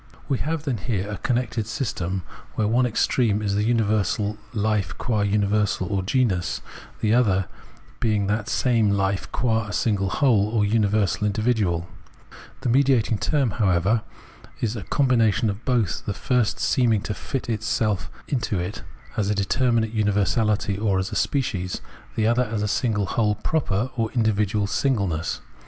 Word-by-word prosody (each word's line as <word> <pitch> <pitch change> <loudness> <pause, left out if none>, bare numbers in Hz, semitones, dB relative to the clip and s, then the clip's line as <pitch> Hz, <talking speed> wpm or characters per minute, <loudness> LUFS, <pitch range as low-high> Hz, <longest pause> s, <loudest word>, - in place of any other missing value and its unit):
We 135 -3 0
have, 160 0 -2
then, 130 -8 -2
here 100 -2 -2
a 105 -1 -5
connected 120 -3 -1
system, 95 - -2 0.3
where 105 - +1
one 125 +3 +3
extreme 115 -2 +1
is 100 -1 0
the 105 +1 +1
universal 105 -2 +1
hfe 105 -4 -1
qua 110 -4 0
universal 100 -1 +1
or 95 - +1
genus, 95 -4 0 0.4
the 110 0 +2
other 100 -6 +3 0.5
being 105 -3 +1
that 105 +2 -1
same 115 -6 +2
Hfe 95 -1 -1
qua 115 -3 0
a - - -6
single 100 -3 0
whole, 110 -4 +3
or 110 -2 +1
universal 105 -1 +1
individual: 105 -6 0 0.7
the - - -1
mediating 125 -4 +3
term, 140 -7 +1
however, 100 +1 +2 0.6
is 115 -3 -1
a 110 - -4
com 135 +8 +1
bination 115 -2 +3
of 100 +4 -8
both, 120 -8 0
the 100 - -2
first 120 +1 0
seeming 115 -5 +2
to 105 - -3
fit 135 +5 -4
itself 105 -5 -1 0.2
into 120 -6 -1
it 90 +3 -4 0.4
as 105 -2 +1
determinate 110 +3 +1
universality 105 -1 +1
or 105 -3 +1
as 95 0 -2
species, 95 -10 -1 0.4
the 110 - +1
other 120 +2 +3
as 105 -2 -2
single 110 -6 0
whole 105 0 +1
proper 125 -6 -1
or 115 -2 -1
individual 105 -3 +1
singleness. 100 - -1
105 Hz, 150 wpm, -24 LUFS, 100-120 Hz, 0.7 s, one